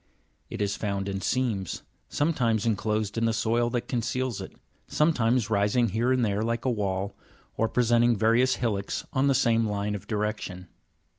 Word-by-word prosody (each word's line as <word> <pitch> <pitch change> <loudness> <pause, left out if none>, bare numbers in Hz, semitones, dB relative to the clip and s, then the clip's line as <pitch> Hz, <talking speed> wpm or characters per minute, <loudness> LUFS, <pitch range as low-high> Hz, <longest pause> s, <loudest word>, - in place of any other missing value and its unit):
It 115 -3 -2
is 100 0 -1
found 100 -2 -2
in 95 -1 -3
seams, 115 -8 -1 0.3
sometimes 125 -8 +1
enclosed 110 0 0
in 115 - +1
the 115 - +1
soil 115 +2 +1
that 120 0 -2
conceals 125 -1 -2
it, - - -7 0.4
sometimes 125 -7 +2
rising 105 +3 +2
here 115 +6 +1
and 130 -2 +2
there 100 0 0
like 115 +2 -2
a 130 - +2
wall, 100 -3 -2 0.4
or 115 - +1
presenting 120 0 +3
various 115 +4 +3
hillocks 105 -5 -2
on 135 +1 +2
the 135 - +3
same 115 -3 +2
line 105 0 -2
of 100 - -6
direction. 105 -4 -3
115 Hz, 165 wpm, -27 LUFS, 105-120 Hz, 0.4 s, presenting